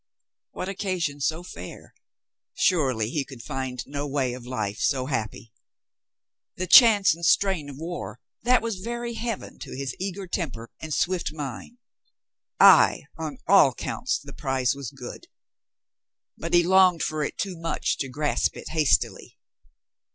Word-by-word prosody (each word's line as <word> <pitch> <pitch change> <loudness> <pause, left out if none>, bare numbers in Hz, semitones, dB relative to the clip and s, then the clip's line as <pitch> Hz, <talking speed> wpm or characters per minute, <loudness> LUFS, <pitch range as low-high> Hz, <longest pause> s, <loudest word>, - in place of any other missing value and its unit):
What 185 - -6
occasion 185 -7 -2
so 160 +5 -1
fair? 180 - -10 0.6
Surely 130 - +1
he 145 -1 -1
could 130 -4 -11
find 130 -2 -4
no 145 +1 -4
way 135 -3 -1
of 125 -1 -9
life 105 -5 -3
so 130 -2 +1
happy. 115 -4 -4 1.0
The 185 - -3
chance 205 -1 +7
and 170 +1 -11
strain 180 -5 +2
of 135 - -9
war, 170 +3 -6 0.2
that 250 +1 +3
was 225 -4 -2
very 235 +3 -4
Heaven 230 -2 -5
to - - -8
his 135 -2 -4
eager 195 +1 -4
temper 135 - -4
and 160 - -7
swift 175 +1 0
mind. 150 - -7 0.8
Ay, - - +7 0.2
on 155 -4 -5
all - - +5
counts - - -2
the - - -12
prize 130 -1 0
was 140 -4 -6
good. - - -10 1.1
But 165 +1 -2
he 175 - +6
longed 185 -1 +4
for 155 -1 -1
it - - -4
too 195 -3 -3
much 165 0 -2
to 135 - -3
grasp 145 +3 0
it - - -8
hastily. 150 - +1
155 Hz, 150 wpm, -25 LUFS, 135-185 Hz, 1.1 s, chance